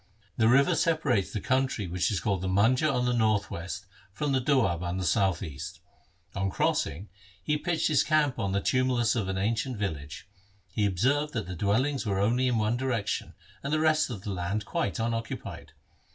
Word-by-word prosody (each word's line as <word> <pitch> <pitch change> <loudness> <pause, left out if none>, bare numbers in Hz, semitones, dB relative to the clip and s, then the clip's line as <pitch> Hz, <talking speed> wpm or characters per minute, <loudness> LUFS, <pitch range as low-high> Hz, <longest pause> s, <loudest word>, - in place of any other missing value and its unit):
The 110 - +3
river 140 +8 +5
separates 155 - +1
the 105 - -2
country 130 -3 0
which 85 0 0
is 100 - 0
called 95 +2 -1
the 95 - -2
Manjha 115 +11 +3
on 125 -2 0
the 125 - +1
north 110 -3 +1
west 95 +4 -5 0.3
from 140 +9 -2
the 130 -1 +2
Doab 120 - +2
on 90 +1 -2
the 95 - -2
south 95 0 +2
east. 70 -4 -7 0.5
On 95 0 -1
crossing 95 0 -1 0.4
he 150 - +1
pitched 165 +1 0
his 150 -4 +3
camp 150 -4 +2
on 100 - -1
the 100 0 0
tumulus 125 -2 +2
of 105 -5 -1
an 95 - -2
ancient 115 +5 -1
village. 75 -4 -5 0.4
He 105 +1 +1
observed 140 +11 +1
that 110 -4 -2
the 90 +1 -6
dwellings 125 - +1
were 100 -4 -1
only 120 +6 +2
in 125 -2 +1
one 110 +2 +1
direction, 120 -5 -2 0.3
and 140 - -4
the 155 - +2
rest 155 -2 +3
of 105 -6 -6
the 105 - -4
land 95 +3 -2
quite 95 0 -2
unoccupied. 115 0 -4
110 Hz, 195 wpm, -28 LUFS, 95-130 Hz, 0.5 s, river